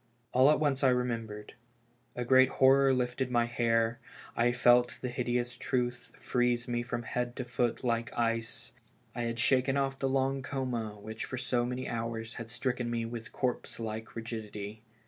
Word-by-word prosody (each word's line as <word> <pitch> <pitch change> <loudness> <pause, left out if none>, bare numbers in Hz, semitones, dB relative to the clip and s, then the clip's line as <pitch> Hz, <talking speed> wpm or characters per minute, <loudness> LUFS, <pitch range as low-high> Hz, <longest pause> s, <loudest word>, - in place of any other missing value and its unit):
All 130 +3 +6
at 150 - +4
once 140 -3 +1
I 135 - +6
remembered. 115 -4 -2 0.6
A 125 - -2
great 130 +1 +6
horror 135 +1 +5
lifted 125 0 0
my 120 -1 +3
hair, 115 0 +1 0.4
I 120 +1 +3
felt 120 0 +4
the 125 - -3
hideous 120 -1 -1
truth 120 -1 -2
freeze 125 -1 0
me 120 -1 0
from 120 0 -4
head 120 +1 -2
to 130 - -4
foot 120 0 -1
like 115 -1 0
ice. 115 0 -1 0.4
I 120 - -3
had 115 0 -2
shaken 130 +3 +3
oft' 135 -1 0
the 135 - 0
long 135 0 +1
coma 125 -6 -3
which 110 +2 -6
for 130 - -5
so 120 -1 0
many 125 +1 -3
hours 115 -1 -3
had 115 -1 -7
stricken 125 0 -2
me 115 -1 -1
with 115 +1 -6
corpse 125 -2 -2
like 110 0 -5
rigidity. 110 -2 -6
120 Hz, 170 wpm, -31 LUFS, 115-130 Hz, 0.6 s, All